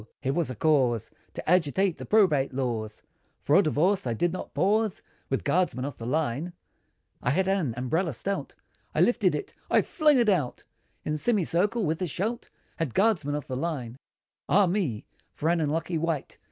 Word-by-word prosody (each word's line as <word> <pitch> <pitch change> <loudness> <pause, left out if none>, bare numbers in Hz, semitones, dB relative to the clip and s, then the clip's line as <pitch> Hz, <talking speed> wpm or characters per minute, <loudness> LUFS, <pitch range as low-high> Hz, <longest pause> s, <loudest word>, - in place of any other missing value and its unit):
So 105 - -16 0.2
ho! 135 - +1
was 165 +2 0
here - - -3
a - - -15
cause, 125 -6 +2 0.2
To - - -7
agitate 180 +2 +2
the - - -8
Probate 150 -11 +3
laws, 115 -5 -3 0.4
For 145 - +2
a 195 - +7
divorce, 175 +1 +1
I 115 - -1
did 175 +9 0
not 185 - -7
pause, 205 +6 +1 0.3
With 135 - -1
guardsman 140 -5 +1
of 140 -3 -6
the 115 - -5
line, 155 +4 -1 0.7
I - - 0
had 185 +8 +1
an 180 - 0
umbrella 160 +7 0
stout, 200 +11 -4 0.4
I - - +3
lifted 230 -6 +3
it, 400 - -5 0.2
I - - +4
flung 300 -3 +3
it 240 -2 +3
out, 170 -12 0 0.4
In 150 0 -1
semicircle, 205 +3 +1
with 160 +3 -1
a 180 - 0
shout, 215 +9 -3 0.3
At 155 -8 -2
guardsman 180 -9 +2
of 150 - -4
the 130 - -4
line! 130 -5 -3 0.5
Ah! 200 +2 +5
me, 175 - -1 0.3
for 160 - 0
an 170 -1 +2
unlucky 160 +2 -1
wight! 165 -3 -3
160 Hz, 185 wpm, -27 LUFS, 135-190 Hz, 0.7 s, a